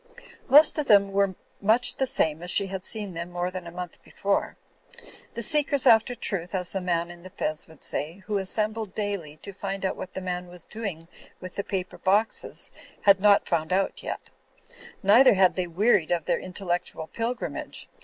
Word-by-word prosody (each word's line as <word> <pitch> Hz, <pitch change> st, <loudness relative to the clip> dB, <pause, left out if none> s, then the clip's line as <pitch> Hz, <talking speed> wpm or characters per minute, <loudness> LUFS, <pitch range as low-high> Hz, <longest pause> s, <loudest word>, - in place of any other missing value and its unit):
Most 300 Hz, +3 st, +7 dB
of 295 Hz, -, -1 dB
them 200 Hz, -2 st, +5 dB
were 195 Hz, -1 st, +1 dB, 0.3 s
much 230 Hz, +5 st, +2 dB
the 265 Hz, -, +1 dB
same 160 Hz, -, 0 dB
as 175 Hz, -, -5 dB
she 200 Hz, -, +5 dB
had 190 Hz, -1 st, -5 dB
seen 210 Hz, -4 st, -2 dB
them 170 Hz, +1 st, -5 dB
more 175 Hz, +1 st, -3 dB
than 185 Hz, -2 st, -7 dB
a -, -, -8 dB
month 180 Hz, 0 st, -8 dB
before. 200 Hz, 0 st, -2 dB, 0.8 s
The 235 Hz, -, -3 dB
seekers 285 Hz, +1 st, +2 dB
after 225 Hz, +2 st, +5 dB
truth 185 Hz, -5 st, -2 dB
(as 180 Hz, -1 st, -2 dB
the 195 Hz, -, -3 dB
man 170 Hz, -1 st, -1 dB
in 175 Hz, 0 st, -12 dB
the 185 Hz, -, -10 dB
fez 155 Hz, -5 st, -3 dB
would 160 Hz, -2 st, -17 dB
say) 165 Hz, +6 st, -4 dB
who 205 Hz, -2 st, -1 dB
assembled 215 Hz, +1 st, -2 dB
daily 200 Hz, -8 st, -3 dB
to 200 Hz, -, -7 dB
find 195 Hz, 0 st, -4 dB
out 190 Hz, -, -1 dB
what 185 Hz, -, -8 dB
the -, -, -2 dB
man 180 Hz, -1 st, -4 dB
was 175 Hz, -1 st, -8 dB
doing 195 Hz, -7 st, -6 dB, 0.3 s
with 185 Hz, -1 st, -8 dB
the 200 Hz, -, -2 dB
paper 185 Hz, -2 st, -4 dB
boxes, 205 Hz, +4 st, +1 dB, 0.3 s
had 200 Hz, -1 st, +6 dB
not 205 Hz, 0 st, +4 dB
found 160 Hz, -1 st, -1 dB
out 190 Hz, +1 st, 0 dB
yet; -, -, -4 dB, 0.8 s
neither 225 Hz, +4 st, +7 dB
had 185 Hz, -1 st, +4 dB
they 185 Hz, -1 st, -1 dB
wearied 180 Hz, 0 st, +2 dB
of 170 Hz, -3 st, 0 dB
their -, -, +1 dB
intellectual 180 Hz, -3 st, -3 dB
pilgrimage. 230 Hz, +8 st, -4 dB
190 Hz, 190 wpm, -26 LUFS, 175-210 Hz, 0.8 s, Most